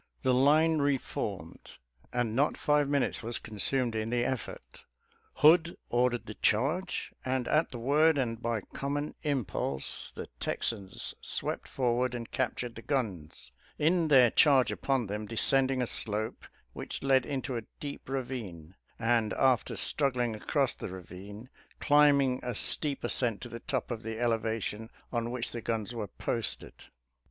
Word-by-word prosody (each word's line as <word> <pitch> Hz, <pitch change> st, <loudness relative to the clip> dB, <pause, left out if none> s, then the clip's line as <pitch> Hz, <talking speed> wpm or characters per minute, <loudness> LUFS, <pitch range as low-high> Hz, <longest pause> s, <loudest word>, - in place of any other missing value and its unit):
The 130 Hz, -1 st, +3 dB
line 155 Hz, +5 st, +4 dB
reformed 140 Hz, -2 st, -3 dB, 0.2 s
— -, -, -47 dB
and 120 Hz, -3 st, -1 dB
not 140 Hz, +4 st, +2 dB
five 150 Hz, -1 st, +2 dB
minutes 140 Hz, -2 st, +1 dB
was 115 Hz, +1 st, -1 dB
consumed 115 Hz, +3 st, 0 dB
in 110 Hz, 0 st, -2 dB
the 120 Hz, 0 st, +1 dB
effort 310 Hz, -, -5 dB, 0.3 s
— 455 Hz, -1 st, -37 dB
Hood 165 Hz, +2 st, +6 dB
ordered 120 Hz, 0 st, +1 dB
the 110 Hz, -, -7 dB
charge, 145 Hz, -, 0 dB
and 130 Hz, -1 st, -1 dB
at 155 Hz, +2 st, +2 dB
the 120 Hz, -, -7 dB
word 145 Hz, +6 st, +3 dB
and 115 Hz, -4 st, -1 dB
by 115 Hz, -2 st, -1 dB
common 145 Hz, +2 st, -2 dB
impulse, 105 Hz, -, -1 dB
the -, -, -5 dB
Texans 100 Hz, -4 st, -3 dB
swept -, -, -3 dB
forward 125 Hz, -1 st, 0 dB
and 115 Hz, -1 st, -6 dB
captured 125 Hz, -1 st, -2 dB
the 115 Hz, -, -9 dB
guns, 110 Hz, -, -3 dB, 0.3 s
in 165 Hz, +2 st, +2 dB
their 130 Hz, -6 st, +6 dB
charge 135 Hz, -4 st, +5 dB
upon 135 Hz, -3 st, 0 dB
them 105 Hz, +1 st, -4 dB
descending 130 Hz, +3 st, +2 dB
a -, -, 0 dB
slope 110 Hz, -1 st, -2 dB, 0.3 s
which -, -, -5 dB
led 135 Hz, -1 st, +4 dB
into 130 Hz, -1 st, -3 dB
a 115 Hz, -2 st, -4 dB
deep 140 Hz, -2 st, -7 dB
ravine, 115 Hz, -11 st, -5 dB, 0.2 s
and 115 Hz, -2 st, +1 dB
after 130 Hz, -5 st, +2 dB
struggling 125 Hz, -5 st, +1 dB
across 135 Hz, +4 st, 0 dB
the -, -, -7 dB
ravine, 95 Hz, +5 st, -9 dB, 0.3 s
climbing 140 Hz, -3 st, +4 dB
a 125 Hz, -2 st, -4 dB
steep 145 Hz, +6 st, 0 dB
ascent 115 Hz, -5 st, 0 dB
to 120 Hz, -, -7 dB
the 115 Hz, 0 st, -7 dB
top -, -, -3 dB
of 115 Hz, -2 st, -3 dB
the 110 Hz, -1 st, -5 dB
elevation 115 Hz, -2 st, -1 dB, 0.2 s
on 120 Hz, -1 st, -1 dB
which 120 Hz, -1 st, -2 dB
the 120 Hz, -, -5 dB
guns 115 Hz, 0 st, -2 dB
were 110 Hz, -3 st, -4 dB
posted. 115 Hz, +3 st, -2 dB
125 Hz, 155 wpm, -30 LUFS, 115-140 Hz, 0.3 s, Hood